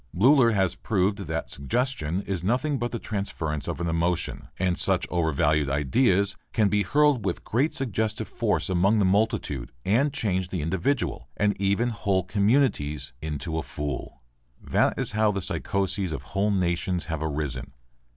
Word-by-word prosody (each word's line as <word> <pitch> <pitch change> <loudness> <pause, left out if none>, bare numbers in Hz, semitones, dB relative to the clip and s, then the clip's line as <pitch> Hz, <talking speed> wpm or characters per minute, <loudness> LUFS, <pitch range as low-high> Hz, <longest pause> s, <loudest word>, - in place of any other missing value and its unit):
Bleuler 120 +1 +5
has 95 -3 +2
proved 100 -1 0
that 80 +1 -3
suggestion 95 - -1
is 95 -4 -3
nothing 130 +7 0
but 120 +1 -2
the 120 - -2
transference 85 - -3
of - - -3
an 85 - -1
emotion. 85 +1 -1
And 90 -1 +1
such - - +1
overvalued 75 -3 +1
ideas 95 - +2 0.2
can 105 -3 +3
be 105 0 +2
hurled 145 +4 +3
with 95 -3 -2
great 135 +8 +1
suggestive 110 -4 -1
force - - 0
among 95 +4 +3
the 100 - +3
multitude 95 - 0
and 125 +9 +3
change 95 -9 -1
the 90 -5 -3
individual 95 - -1
and 105 0 +2
even 100 +5 +2
whole 100 -4 0
communities 100 - +1
into 80 +1 -3
a - - -1
fool. 70 -4 -6 0.4
That - - +1
is - - 0
how 110 0 +2
the 100 - -2
psychoses 95 -1 -1
of - - -5
whole 100 +2 +2
nations 90 -1 0
have 80 -2 -4
arisen. 75 -4 -3
95 Hz, 160 wpm, -26 LUFS, 80-110 Hz, 0.4 s, Bleuler